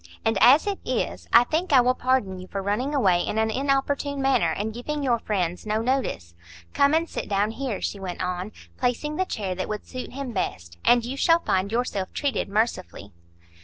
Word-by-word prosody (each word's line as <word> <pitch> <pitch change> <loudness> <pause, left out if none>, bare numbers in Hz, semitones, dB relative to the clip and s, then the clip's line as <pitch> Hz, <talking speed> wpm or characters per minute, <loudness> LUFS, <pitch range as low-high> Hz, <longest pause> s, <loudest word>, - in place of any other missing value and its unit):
And 225 - +2
as 260 +7 +7
it 405 -1 -2
is, - - -2
I 235 +1 +8
think 320 +8 -1
I 270 - +7
will 250 +1 +4
pardon 255 -8 0
you 185 - -9
for 195 - -4
running 245 +9 -1
away 185 -10 +3
in 210 - -3
an 220 0 +1
inopportune 275 +2 0
manner, 265 -10 +2
and 210 +6 -3
giving 290 +5 -4
your 240 -3 +2
friends 180 -5 -2
no 215 0 -1
notice. 250 - -1 0.4
Come 280 +2 +4
and 330 +1 +1
sit - - -5
down 205 +1 +1
here," 250 -3 -3
she 200 - -3
went 185 -2 -6
on, 180 +2 -3 0.3
placing 260 +5 -1
the 375 - +1
chair 200 - -3
that 185 +1 -4
would 210 0 -4
suit 255 -1 -7
him 270 -1 -5
best, 85 - -4
"and 240 -1 +4
you 255 +3 -4
shall 330 +4 +3
find 190 +2 0
yourself 225 -5 -2
treated 285 -7 -1
mercifully." 200 - -2
235 Hz, 200 wpm, -25 LUFS, 195-275 Hz, 0.4 s, I